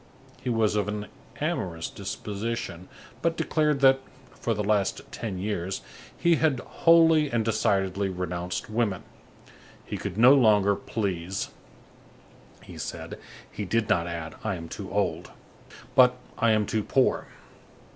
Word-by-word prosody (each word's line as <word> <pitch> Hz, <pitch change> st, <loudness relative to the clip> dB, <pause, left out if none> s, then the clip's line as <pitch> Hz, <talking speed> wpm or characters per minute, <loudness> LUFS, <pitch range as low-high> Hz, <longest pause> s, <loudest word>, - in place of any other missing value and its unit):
He -, -, -3 dB
was 110 Hz, -3 st, +2 dB
of 105 Hz, -1 st, +1 dB
an 105 Hz, 0 st, -3 dB, 0.3 s
amorous 85 Hz, -2 st, -2 dB
disposition, 100 Hz, -2 st, -5 dB, 0.3 s
but 165 Hz, 0 st, 0 dB
declared 150 Hz, -3 st, +1 dB
that, 135 Hz, 0 st, +6 dB, 0.3 s
for 115 Hz, -, -2 dB
the 105 Hz, -, -1 dB
last 105 Hz, -1 st, +1 dB
ten 105 Hz, -5 st, -4 dB
years, 95 Hz, -1 st, -3 dB, 0.4 s
he 170 Hz, -1 st, +3 dB
had 150 Hz, -5 st, +2 dB
wholly 165 Hz, -1 st, +4 dB
and 115 Hz, -2 st, +1 dB
decidedly 100 Hz, -3 st, +1 dB
renounced 90 Hz, -1 st, -3 dB
women. 110 Hz, -4 st, -1 dB, 0.8 s
He -, -, -4 dB
could 90 Hz, -, -5 dB
no 125 Hz, +4 st, +8 dB
longer 105 Hz, -6 st, +5 dB
please, 95 Hz, -4 st, -3 dB, 1.1 s
he -, -, -11 dB
said; -, -, -6 dB, 0.3 s
he 105 Hz, -, -5 dB
did 110 Hz, +3 st, 0 dB
not 85 Hz, -1 st, +2 dB
add: 85 Hz, -2 st, -5 dB
"I 110 Hz, -3 st, -1 dB
am 85 Hz, -2 st, -8 dB
too 100 Hz, -3 st, -7 dB
old," 90 Hz, -4 st, -1 dB, 0.6 s
but: 125 Hz, -1 st, +6 dB, 0.2 s
"I 115 Hz, -, +2 dB
am 110 Hz, -1 st, +3 dB
too 110 Hz, -, 0 dB
poor." 130 Hz, +4 st, +2 dB
105 Hz, 135 wpm, -27 LUFS, 95-120 Hz, 1.1 s, no